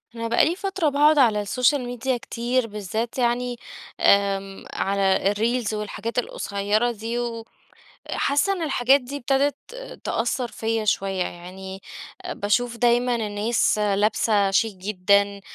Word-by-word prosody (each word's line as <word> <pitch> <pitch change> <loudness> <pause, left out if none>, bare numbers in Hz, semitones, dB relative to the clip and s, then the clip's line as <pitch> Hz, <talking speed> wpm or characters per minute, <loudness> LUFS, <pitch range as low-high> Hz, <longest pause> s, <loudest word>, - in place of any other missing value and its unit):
أنا 230 0 -3
بقى 230 - +4
لي 335 +3 0
فترة 385 -5 -1
باقعد 295 +2 +4
على 220 -6 +4
السوشيال 250 +7 +2
ميديا 245 +1 -2
كتير 240 +1 -1
بالذات 215 +4 -4
يعني 245 0 0 0.4
آمم، 195 -1 +2
على 195 0 +1
الreels 230 0 0
والحاجات 215 +3 -3
القصيَّرة 210 +1 -1
دي، 230 +2 -4 0.7
وحاسة 290 +8 0
إن 370 -3 -3
الحاجات 275 -2 +3
دي 265 +3 -7
ابتدت 275 +2 +1 0.5
تأثر 245 +2 -1
فيَّ 225 -1 -2
شوية، 195 -2 0
يعني 190 +2 -8 0.5
باشوف 235 - 0
دايمًا 240 +1 +2
الناس 215 +1 0
لابسة 205 0 +2
شيك 205 0 +1
جدًا، 200 +1 +1
230 Hz, 125 wpm, -23 LUFS, 200-250 Hz, 0.7 s, بقى